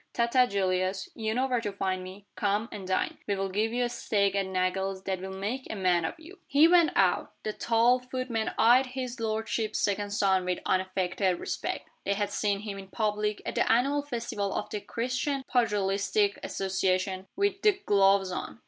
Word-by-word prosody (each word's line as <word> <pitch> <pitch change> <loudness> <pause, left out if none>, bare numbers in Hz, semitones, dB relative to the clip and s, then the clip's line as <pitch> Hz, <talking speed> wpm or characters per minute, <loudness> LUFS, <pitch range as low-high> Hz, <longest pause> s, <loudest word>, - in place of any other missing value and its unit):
Ta 235 - +2
ta, 250 +1 +4
Julius. 190 -1 -1
You 220 -1 -2
know 255 +2 +2
where 250 -3 0
to 210 -3 -3
find 190 -2 -2
me. 190 +2 -10
Come, 205 +2 0
and 195 -3 -7
dine. 185 - -1
We'll 195 -1 -1
give 215 +4 0
you 245 +1 0
a - - +1
steak 200 -4 0
at 195 -1 0
Nagle's 190 +1 -1
that 190 -2 -2
will 190 - -5
make 230 +7 -3
a - - -3
man 180 -4 +2
of 165 - -5
you." 355 +5 -13
He 290 +3 +6
went 340 -2 +5
out. - - +2
The 215 - -2
tall 235 +3 +3
footmen 250 -3 -3
eyed 245 +4 +5
his 255 -1 -5
lordship's 220 0 -1
second 205 0 0
son 195 -2 +2
with 180 0 -1
unaffected 185 0 0
respect. - - -4 0.2
They 200 - 0
had 205 0 -1
seen 200 -1 0
him, 205 -2 -6
in 195 - -10
public, 210 0 -1
at - - -3
the - - +2
annual 275 +5 +3
festival 235 -7 -3
of 210 - -3
the 210 - -3
Christian 255 +5 -2
Pugilistic 205 -4 +1
Association, 190 0 -1
with 395 0 0
"the 415 -2 +3
gloves" 195 -1 +4
on. 180 - -5
205 Hz, 190 wpm, -28 LUFS, 190-240 Hz, 0.2 s, He